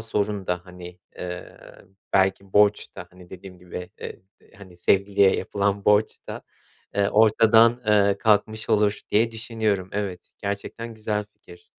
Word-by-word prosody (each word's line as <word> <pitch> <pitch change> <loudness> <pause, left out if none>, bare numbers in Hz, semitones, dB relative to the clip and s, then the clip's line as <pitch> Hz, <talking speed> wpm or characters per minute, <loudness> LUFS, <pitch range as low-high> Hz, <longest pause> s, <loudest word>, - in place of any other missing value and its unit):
sorun 105 -3 -2
da, 90 -1 -1
hani, 90 0 -11 0.2
eee, 90 0 -7 0.6
belki 95 0 +1
borç 105 0 +3
da, 90 - -8
hani, 90 -1 -17
dediğim 95 -1 -11
gibi, 90 0 -8
eee, - - -8 0.2
d - - -26
hani, 95 -3 -14
sevgiliye 100 +2 +3
yapılan 100 0 -1
borç 105 +1 +3
da, - - -6 0.5
eee, 100 0 +2
ortadan, 115 +2 +4
eee, 100 -2 +3
kalkmış 110 0 +1
olur 105 -1 +2
diye 115 +2 +3
düşünüyorum. 110 -4 -2
Evet, 95 -4 -5
gerçekten 105 +3 -5
güzel 105 -1 -2
fikir. 85 0 -17
100 Hz, 140 wpm, -24 LUFS, 95-110 Hz, 0.6 s, ortadan